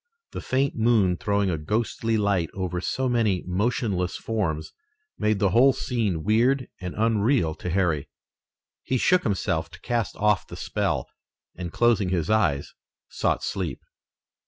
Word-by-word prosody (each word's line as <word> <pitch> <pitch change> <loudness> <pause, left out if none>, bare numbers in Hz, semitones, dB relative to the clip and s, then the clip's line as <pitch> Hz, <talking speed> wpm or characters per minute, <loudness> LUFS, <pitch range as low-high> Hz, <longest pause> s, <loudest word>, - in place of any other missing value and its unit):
The - - -5
faint 135 +2 0
moon 110 -6 +3
throwing 100 -2 0
a 80 - -2
ghostly 110 +5 -1
light 100 -5 +1
over 90 -2 -2
so 130 +6 -1
many 115 -7 +1
motionless 100 -1 -1
forms 85 -9 -2 0.5
made 105 0 +2
the 100 -2 +2
whole 130 +6 +6
scene 105 -13 -1
weird 120 +5 +2
and 90 -1 -6
unreal 110 - +2
to 90 - -3
Harry. 85 -5 0 0.7
He 130 - -1
shook 180 +8 +3
himself 80 - -1
to 85 - -14
cast 120 -3 -1
off 105 -2 +1
the - - -9
spell, - - -1 0.5
and, 85 -2 -6
closing 110 -2 +2
his 85 -1 0
eyes, 85 -11 +1 0.4
sought - - 0
sleep. - - -3
105 Hz, 145 wpm, -25 LUFS, 90-115 Hz, 0.7 s, whole